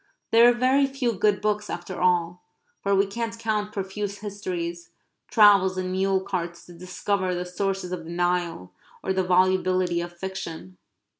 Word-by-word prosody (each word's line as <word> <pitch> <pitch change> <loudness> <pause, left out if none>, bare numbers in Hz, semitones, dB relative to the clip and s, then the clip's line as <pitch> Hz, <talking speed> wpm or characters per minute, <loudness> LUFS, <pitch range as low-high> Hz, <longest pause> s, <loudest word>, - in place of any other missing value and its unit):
There 230 +1 +7
are - - +6
very 260 +3 +3
few 265 -3 -1
good 205 0 +1
books 210 0 -1
after 175 +1 -5
all, 180 -1 +1 0.4
for 200 0 +1
we 195 +1 +4
can't 230 +3 -4
count 215 -2 -1
profuse 200 +1 -4
histories, 180 -5 -5 0.4
travels 200 -3 +5
in 185 0 -2
mule 190 0 +1
carts 175 -3 -4
to 175 - -13
discover 185 +1 -2
the 180 0 -3
sources 190 0 -3
of 175 -3 -5
the - - -9
Nile, 175 - -1 0.3
or 190 - 0
the 190 - +1
volubility 185 -1 +2
of 175 0 -8
fiction. 170 - -7
190 Hz, 160 wpm, -25 LUFS, 175-205 Hz, 0.4 s, There